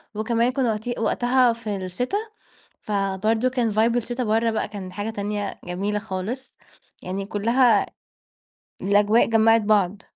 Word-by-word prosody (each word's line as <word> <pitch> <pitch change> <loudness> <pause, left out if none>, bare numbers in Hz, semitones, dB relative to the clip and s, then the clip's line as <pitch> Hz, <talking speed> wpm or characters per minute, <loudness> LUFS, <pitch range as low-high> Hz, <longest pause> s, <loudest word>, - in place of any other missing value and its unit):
وكمان 230 +3 +1
كنا 255 -4 0
وقتي 220 +3 -3
وقتَها 245 +2 +2
في 220 -3 -5
الشتا، 195 - -3 0.6
فبرضه 210 +4 0
كان 245 -4 0
vibe 225 +3 +2
الشتا 245 +1 -2
برّه 225 +1 +1
بقى 220 - -1
كان 195 -3 -8
حاجة 205 +2 -4
تانية 205 -1 -3
جميلة 200 +4 -2
خالص، 220 +6 -6 0.5
يعني 195 +2 -4
كلها 230 +1 +3 1.0
الأجواء 205 +3 +4
جمعِت 225 0 +4
بعض. 205 -2 +1
220 Hz, 130 wpm, -23 LUFS, 205-235 Hz, 1.0 s, الأجواء